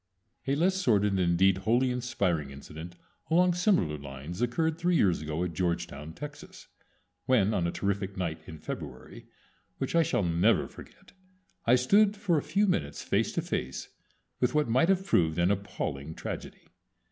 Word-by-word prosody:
A 135 - +2
less 185 +5 +2
sordid, 105 - +2
and 95 - 0
indeed 90 +2 +3
wholly 120 +6 +2
inspiring, 95 - -1
incident 80 +5 -9 0.3
along 180 +2 +4
similar 175 - +1
lines 70 - -7
occurred 160 +7 0
three 175 0 +2
years 90 - +3
ago 75 +2 -2
at 90 -2 -3
Georgetown, 85 -4 -2
Texas, 145 - -10 0.6
when 110 -5 +3
on 85 -4 +1
a - - -1
terrific 100 -1 -2
night 80 -4 -3
in 80 -3 -8
February, 65 -3 -8 0.5
which 135 - -3
I 170 - +6
shall 125 -9 +1
never 85 +6 +2
forget, - - -15 0.6
I 120 - +7
stood 200 +11 +4
for 180 -6 +1
a - - -4
few 190 +9 +1
minutes 75 - -1
face - - +1
to - - -1
face 65 +2 -4 0.5
with 125 +3 +1
what 150 -3 +3
might 130 +9 +3
have 190 0 +2
proved 80 - +2
an 85 +2 +3
appalling 80 -7 -4
tragedy. - - -7
100 Hz, 165 wpm, -29 LUFS, -, 0.6 s, I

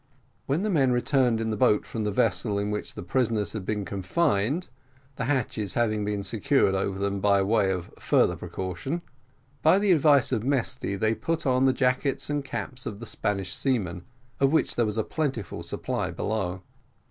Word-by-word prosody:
When 145 +8 0
the 215 - 0
men 135 -7 +3
returned 125 -1 +2
in 110 0 -1
the - - -1
boat 105 0 +3
from 110 -2 -4
the 105 - 0
vessel 100 +1 +1
in 100 +1 -1
which 105 - -3
the - - -6
prisoners 110 -2 0
had 110 - -4
been 105 -2 -1
confined 105 - 0 0.5
(the 125 - -2
hatches 120 -7 -1
having 110 -3 +1
been 105 -1 -2
secured 105 +2 +2
over 95 0 -1
them, 100 0 -1
by 100 0 +3
way 100 -1 +2
of 90 -2 -3
further - - +3
precaution), 95 - -4 0.6
by 160 +4 +5
the 200 -1 +3
advice 145 -5 +5
of 110 - 0
Mesty 130 -6 -1
they 110 +3 +1
put 165 +7 -2
on 130 0 +3
the 135 - +5
jackets 130 +2 0
and 145 -1 -1
caps 130 -1 -5
of 100 - -5
the 115 - -8
Spanish 95 -4 -2
seamen, 100 -10 -1 0.4
of 135 0 +3
which 160 - +2
there 120 -2 +2
was 105 +1 -3
a 110 - +2
plentiful 135 - -3
supply - - -3
below. 95 -4 -3
110 Hz, 185 wpm, -26 LUFS, 100-135 Hz, 0.6 s, by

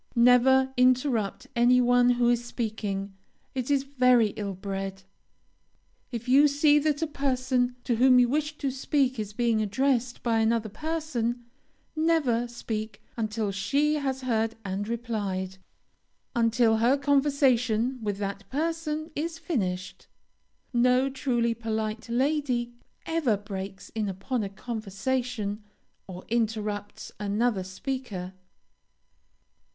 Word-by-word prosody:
Never 255 +2 +5
interrupt 250 -3 +2
any 240 +1 +5
one 245 0 +4
who 245 -1 +3
is 240 0 +2
speaking. 210 -5 -4 0.4
It 255 -1 -3
is 280 -2 +2
very 250 -5 +4
ill 200 -2 -5
bred. 195 0 -5 1.1
If 235 0 -5
you 275 +4 +6
see 290 +1 +4
that 300 +1 0
a - - +3
person 255 -4 0
to 235 - 0
whom 255 +1 +6
you 245 -1 +6
wish 300 +3 -1
to 275 -2 -1
speak 265 -1 0
is 210 -1 -3
being 230 0 +1
addressed 240 +3 0
by 230 -2 +2
another 225 0 +1
person, 245 -3 -3 0.5
never 310 -7 +2
speak 220 -3 -5
until 215 -2 -2
she 275 +11 +1
has 270 -3 -2
heard 225 -3 0
and 195 +2 -3
replied; 205 -5 -3 0.8
until 230 -1 +3
her 240 +5 +3
conversation 265 -4 +2
with 205 -2 -2
that 200 0 -5
person 310 +1 -2
is 325 +2 -3
finished. 190 - -3 0.7
No 250 +2 +3
truly 240 -3 0
polite 220 -1 -3
lady 250 -2 0 0.3
ever 310 -10 +1
breaks 195 -1 -7
in 215 -2 -2
upon 195 +6 -3
a 200 - -3
conversation 215 +1 -3 0.5
or 185 -1 -9
interrupts 215 -3 -2
another 210 0 0
speaker. 190 -2 -5
240 Hz, 120 wpm, -27 LUFS, 215-265 Hz, 1.1 s, you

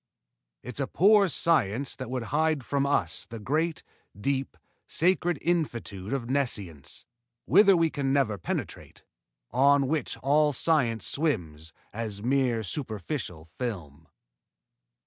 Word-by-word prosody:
_It's 125 +2 -5
a 135 - 0
poor 200 +6 +5
science 140 -7 +1
that 130 -1 -7
would 125 -2 -2
hide 155 -3 +1
from 140 +3 0
us 145 - -1
the 115 - -7
great, 155 +9 -1 0.4
deep, 135 +4 -2 0.3
sacred 175 -1 +2
infinitude 120 - -2
of 135 -4 -2
Nescience, 105 - -3 0.4
whither 200 -3 +6
we 165 -1 +2
can 135 -2 -1
never 135 -8 +1
penetrate, - - -5 0.5
on 140 +2 +4
which 150 -2 -2
all 150 +2 +3
science 120 - +1
swims 80 - -2 0.2
as 105 -2 -4
mere 125 -3 +1
superficial 110 - -5
film. 80 - -6
135 Hz, 120 wpm, -27 LUFS, 110-150 Hz, 0.5 s, whither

